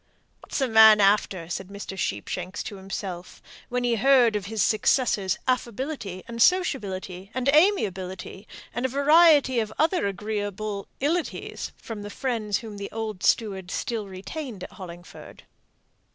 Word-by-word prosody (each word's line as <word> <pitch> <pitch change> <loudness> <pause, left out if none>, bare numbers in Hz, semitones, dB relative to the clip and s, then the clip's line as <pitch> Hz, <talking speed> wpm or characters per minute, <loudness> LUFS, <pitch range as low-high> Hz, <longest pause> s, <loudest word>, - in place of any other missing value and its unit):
"What's - - -6
the 270 - +1
man 220 -2 +8
after?" 195 -4 +2
said 180 +2 -5
Mr. 200 0 -7
Sheepshanks 180 - -3
to 205 - -7
himself, 190 -2 -6 0.3
when 245 0 -1
he 240 -1 +1
heard 245 -2 +5
of 200 -2 -3
his 220 -2 0
successor's 215 -3 +2
affability, 245 - -2
and 235 0 -5
sociability, 200 - +1
and 255 0 -1
amiability, 195 - +1 0.3
and 240 - -3
a 260 - +1
variety 285 -1 +5
of 215 -2 -2
other 325 - +2
agreeable 205 0 -4
"ilities," 320 +4 -2
from 220 -3 -7
the 205 - -7
friends 220 -3 -2
whom 220 -3 -8
the 200 0 -6
old 215 -4 -5
steward 195 -5 +1
still 220 +1 -3
retained 200 +3 -7
at - - -8
Hollingford. 175 -2 -11
215 Hz, 140 wpm, -25 LUFS, 195-255 Hz, 0.3 s, man